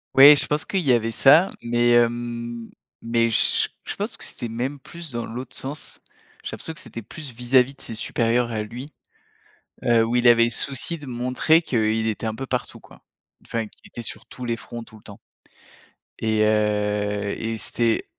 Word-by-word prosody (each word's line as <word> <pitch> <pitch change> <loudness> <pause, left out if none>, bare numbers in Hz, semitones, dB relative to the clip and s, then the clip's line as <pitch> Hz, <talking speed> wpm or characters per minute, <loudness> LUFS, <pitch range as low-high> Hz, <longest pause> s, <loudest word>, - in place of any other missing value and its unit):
Oui, 140 +2 +10
je 140 -1 +1
pense 150 +1 0
qu'il 195 - -1
y 140 - +2
avait 115 -1 +1
ça, 155 +10 +6
mais, 120 0 +2
hem, 120 0 0 0.3
mais 115 0 +2
j 110 - +2 0.2
je - - -5
pense - - -3
que - - -10
c'était 120 - -4
même 130 +5 -3
plus 165 +1 -9
dans 120 -1 -3
l'autre 125 +3 -7
sens. 140 +3 -5 0.4
J'ai - - -5
l'impression 160 - -5
que 160 - -8
c'était 115 - -8
plus 145 +3 -9
vis-à-vis 125 +3 +2
de - - -12
ses 115 - -7
supérieurs 120 +1 0
à 110 -2 -2
lui, 120 +6 -8 1.0
heu, 115 -1 +4
où 115 +2 -2
il 120 0 +4
avait 115 0 +7
le 120 - 0
souci 140 +7 +1
de 145 - -11
montrer 125 +7 +2
qu'il 110 -4 0
était 110 +1 -2
un 110 - -2
peu 135 - -5
partout 125 -1 -3
quoi. - - -18 0.4
Enfin 115 -1 -3
qu'il - - -16
était 120 - -8
sur - - -5
tous 125 - -9
les 115 -1 -1
fronts 115 0 -8
tout 110 - -16
le - - -17
temps. 100 -2 -12 1.0
Et 110 -1 +1
heu 105 -1 +1
et 115 0 -3
c'était 115 +1 0
120 Hz, 195 wpm, -23 LUFS, 115-130 Hz, 1.0 s, Oui